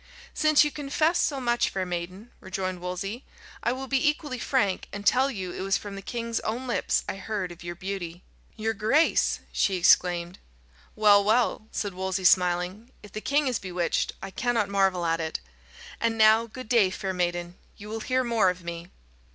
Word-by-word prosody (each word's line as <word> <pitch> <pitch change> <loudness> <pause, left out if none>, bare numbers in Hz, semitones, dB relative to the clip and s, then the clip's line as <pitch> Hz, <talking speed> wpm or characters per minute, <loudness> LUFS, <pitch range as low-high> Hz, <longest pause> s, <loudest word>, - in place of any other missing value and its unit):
"Since 310 -1 +5
you 295 - -1
confess 305 +4 0
so 280 -2 +1
much, 240 -1 +1
fair 190 -1 -2
maiden," 180 +5 -6
rejoined 185 -1 -4
Wolsey, 195 +7 -4 0.4
"I 235 - +1
will 260 +2 -4
be 270 +2 +2
equally 295 -4 -4
frank, 205 -9 0
and 205 0 -7
tell 260 +5 +4
you 190 -8 -5
it - - -6
was 195 0 +1
from 205 -1 -8
the 195 - -7
king's 230 +1 -3
own 235 +4 -3
lips 245 - 0
I - - -4
heard 195 -2 -3
of 175 0 -11
your 175 0 -5
beauty." 185 -2 -6 0.3
"Your 225 0 -1
grace!" 220 +10 +2
she 195 - +1
exclaimed. 175 0 +3 0.6
"Well, 205 -1 +6
well," 220 +1 +1
said 205 -2 -3
Wolsey, 190 0 -2
smiling, 180 +4 +2
"if 210 - -12
the 215 - -6
king 290 +4 +1
is 255 -4 0
bewitched, 180 -3 -1
I 195 - -6
cannot 230 -1 0
marvel 195 -3 +2
at 165 0 +1
it. 160 0 -3 0.6
And 230 -1 0
now, 220 +1 +5
good 255 +2 -9
day, 225 -5 +4
fair 190 0 -4
maiden; 175 -1 -2 0.2
you 205 - -10
will 220 +1 -4
hear 255 +3 0
more 230 -6 +3
of 180 0 -5
me." 170 0 -6
205 Hz, 185 wpm, -26 LUFS, 180-240 Hz, 0.6 s, Well